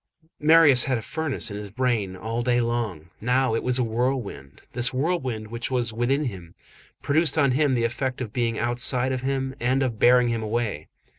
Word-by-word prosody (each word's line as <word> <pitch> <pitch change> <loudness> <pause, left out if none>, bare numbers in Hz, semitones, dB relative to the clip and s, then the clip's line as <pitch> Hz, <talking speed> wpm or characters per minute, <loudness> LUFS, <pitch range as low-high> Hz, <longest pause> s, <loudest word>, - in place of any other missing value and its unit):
Marius 150 -4 +6
had 135 - -1
had - - 0
a - - -5
furnace 155 -6 -3
in 100 - -5
his 105 -1 -7
brain 110 -4 -1
all 115 +5 -4
day 120 0 +1
long; 115 -9 -3
now 125 +1 +1
it 115 - 0
was 125 0 +1
a 125 - +1
whirlwind. 115 - -3
This 120 0 +2
whirlwind 130 -6 -2
which 115 +1 -4
was 120 -4 -1
within 125 +6 0
him, 90 -8 -7 0.5
produced 155 +1 +1
on 140 -3 +3
him 140 0 +2
the 120 - 0
effect 125 +2 -2
of 115 -5 -5
being 115 -2 -1
outside 125 +2 +1
of 130 -1 -2
him 135 0 -2
and 130 +3 +1
of 120 -4 -3
bearing 125 0 +5
him 115 -1 -1
away. 110 -8 -3
120 Hz, 200 wpm, -24 LUFS, 115-130 Hz, 0.5 s, Marius